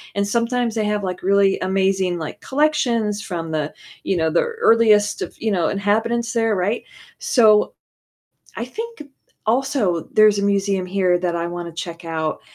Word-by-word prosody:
and 200 Hz, 0 st, +1 dB
sometimes 235 Hz, +1 st, 0 dB
they 220 Hz, -, 0 dB
have, 210 Hz, -1 st, -1 dB
like, 185 Hz, -1 st, -4 dB
really 195 Hz, 0 st, +3 dB
amazing, 190 Hz, -1 st, 0 dB
like, 160 Hz, -, -6 dB
collections 245 Hz, -8 st, 0 dB
from 165 Hz, -5 st, -5 dB
the 155 Hz, -1 st, -2 dB, 0.3 s
you 195 Hz, -, 0 dB
know, 160 Hz, -1 st, +1 dB
the 165 Hz, -, +2 dB
earliest 225 Hz, -, +3 dB
of, -, -, -8 dB
you 220 Hz, -, 0 dB
know, 175 Hz, -4 st, +1 dB
inhabitants 225 Hz, +4 st, 0 dB
there, 225 Hz, -2 st, +1 dB
right? 200 Hz, +5 st, -1 dB, 0.4 s
So 215 Hz, -4 st, +4 dB, 0.8 s
I 230 Hz, -, -3 dB
think, 455 Hz, -, -7 dB, 0.4 s
also, 220 Hz, -, 0 dB
there's 215 Hz, -1 st, +5 dB
a 200 Hz, -, -1 dB
museum 195 Hz, -1 st, 0 dB
here 185 Hz, -1 st, +1 dB
that 175 Hz, -1 st, -1 dB
I 170 Hz, 0 st, -2 dB
wanna 175 Hz, 0 st, -6 dB
check 170 Hz, +1 st, -7 dB
out, 160 Hz, -1 st, -3 dB
200 Hz, 165 wpm, -21 LUFS, 180-230 Hz, 0.8 s, there's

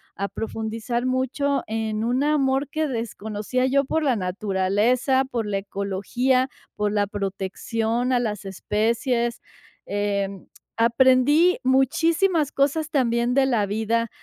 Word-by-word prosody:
a 200 Hz, -, -2 dB
profundizar 225 Hz, +3 st, -3 dB
mucho 260 Hz, +2 st, 0 dB
en 220 Hz, 0 st, -2 dB
un 250 Hz, +4 st, +1 dB
amor 275 Hz, -2 st, +1 dB
que 315 Hz, +1 st, -1 dB
desconocía 225 Hz, +1 st, -2 dB
yo 275 Hz, +1 st, +2 dB
por 320 Hz, +3 st, 0 dB
la 265 Hz, -4 st, +2 dB
naturaleza, 205 Hz, +7 st, +1 dB
por 240 Hz, -4 st, -3 dB
la 200 Hz, -1 st, -1 dB
ecología, 205 Hz, +7 st, 0 dB, 0.3 s
por 210 Hz, 0 st, 0 dB
la 205 Hz, -1 st, +1 dB
protección 215 Hz, +5 st, -2 dB
a 250 Hz, -, +3 dB
las 210 Hz, -4 st, -3 dB
especies, 230 Hz, +5 st, -1 dB, 0.4 s
em, 200 Hz, -1 st, -2 dB, 0.3 s
aprendí 260 Hz, +8 st, +4 dB
muchísimas 310 Hz, +5 st, +2 dB
cosas 290 Hz, +3 st, 0 dB
también 245 Hz, -3 st, +1 dB
de 270 Hz, -1 st, +4 dB
la 235 Hz, -6 st, +1 dB
vida, 225 Hz, +2 st, 0 dB
235 Hz, 120 wpm, -23 LUFS, 210-265 Hz, 0.4 s, aprendí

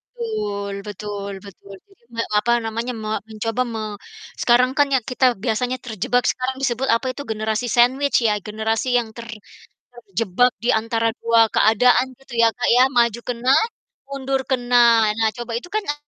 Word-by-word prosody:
Betul 205 Hz, -, -4 dB
betul 205 Hz, 0 st, -6 dB
betul, 200 Hz, 0 st, -13 dB
jadi 390 Hz, -10 st, -27 dB
nge 230 Hz, -, 0 dB, 0.2 s
apa 235 Hz, +3 st, 0 dB
namanya, 230 Hz, +3 st, -3 dB
me 215 Hz, -, -4 dB, 0.2 s
mencoba 225 Hz, +2 st, -3 dB
me 220 Hz, -, -4 dB, 0.6 s
sekarang 250 Hz, +1 st, +4 dB
kan 290 Hz, -1 st, +4 dB
ya -, -, +3 dB
kita 255 Hz, +1 st, +1 dB, 0.2 s
biasanya 250 Hz, +2 st, -1 dB
terjebak, 245 Hz, +2 st, 0 dB
sekarang 255 Hz, +1 st, -3 dB
disebut 260 Hz, 0 st, -1 dB
apa 230 Hz, -, -3 dB
itu 270 Hz, -, -8 dB
generasi 220 Hz, +2 st, -2 dB
sandwich 260 Hz, +4 st, +3 dB
ya, 210 Hz, -, +2 dB
generasi 220 Hz, +2 st, -2 dB
yang 240 Hz, -2 st, -1 dB
ter 235 Hz, 0 st, -8 dB, 0.6 s
terjebak 230 Hz, 0 st, 0 dB
di -, -, 0 dB
antara 225 Hz, +1 st, +1 dB
2 230 Hz, 0 st, +3 dB
keadaan 245 Hz, +4 st, +4 dB
gitu 270 Hz, -1 st, -17 dB
ya, 230 Hz, -, +6 dB
Kak, 245 Hz, -, -1 dB
ya, 250 Hz, -, +6 dB
maju 235 Hz, -1 st, +3 dB
kena, 245 Hz, +1 st, -1 dB, 0.6 s
mundur 270 Hz, -1 st, -2 dB
kena. 245 Hz, -1 st, +1 dB, 0.4 s
Nah, 225 Hz, -1 st, +3 dB
coba 240 Hz, -1 st, -6 dB
itu 250 Hz, -, -12 dB
kan 430 Hz, -, +1 dB
na 290 Hz, -, 0 dB
235 Hz, 165 wpm, -21 LUFS, 220-255 Hz, 0.6 s, ya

